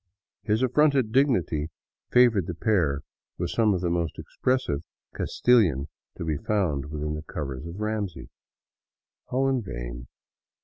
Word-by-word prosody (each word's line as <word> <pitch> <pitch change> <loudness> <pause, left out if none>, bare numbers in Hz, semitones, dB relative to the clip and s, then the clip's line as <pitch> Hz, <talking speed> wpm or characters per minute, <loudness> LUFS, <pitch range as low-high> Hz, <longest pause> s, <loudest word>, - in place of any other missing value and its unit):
His 110 +3 +1
affronted 135 -2 +3
dignity 100 - +2 0.4
favored 120 -8 +5
the 85 - -4
pair 80 -8 +1 0.4
with - - -2
some 110 -2 +3
of 90 - -2
the 90 - 0
most 85 -2 -1
expressive 125 - -1 0.3
Castilian 90 - +2 0.3
to - - -4
be 80 -2 0
found 80 -8 0
within 75 0 -3
the 75 - -4
covers 70 -2 -5
of 85 +4 -8
Ramsey. 105 -4 -3 1.0
All 135 +2 +1
in 135 -2 +1
vain. - - -6
90 Hz, 135 wpm, -26 LUFS, 75-120 Hz, 1.0 s, favored